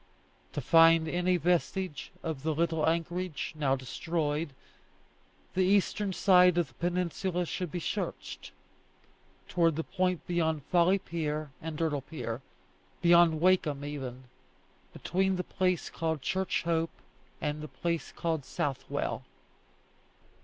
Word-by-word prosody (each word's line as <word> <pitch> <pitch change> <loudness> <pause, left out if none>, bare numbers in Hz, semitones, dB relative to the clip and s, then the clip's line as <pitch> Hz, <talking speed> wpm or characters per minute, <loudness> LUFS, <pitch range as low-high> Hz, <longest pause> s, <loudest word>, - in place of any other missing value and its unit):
To 145 - -2
find 165 +3 +6
any 180 +2 +1
vestige 175 -1 -1
of 160 -5 -3
the 155 +1 -1
little 160 -1 +2
anchorage, 170 -1 -2
now 140 -3 +2
destroyed, 150 +4 -2 1.0
the 185 - +2
eastern 200 +1 +2
side 180 -1 +5
of 170 -5 +1
the - - -22
peninsula 180 +2 -1
should 180 -1 -4
be 175 - -2
searched, - - -4 1.0
towards 165 -3 +2
the 165 - -1
point 185 -1 -1
beyond 160 -4 0
Folly 175 +5 +4
Pier 155 -5 -3
and 160 -1 -5
Dirdle 150 -3 0
Pier, 130 -5 -5 0.6
beyond 170 -2 +6
Wakeham 165 -6 +2
even, 130 -3 -5 0.7
between 190 +2 0
the 180 - -2
place 185 -3 0
called 160 -4 -2
Church 190 +3 0
Hope 165 -1 +1 0.5
and 150 -1 -2
the 155 - -6
place 170 +1 -3
called 160 -4 -2
Southwell. 135 +1 -2
165 Hz, 125 wpm, -30 LUFS, 150-180 Hz, 1.0 s, find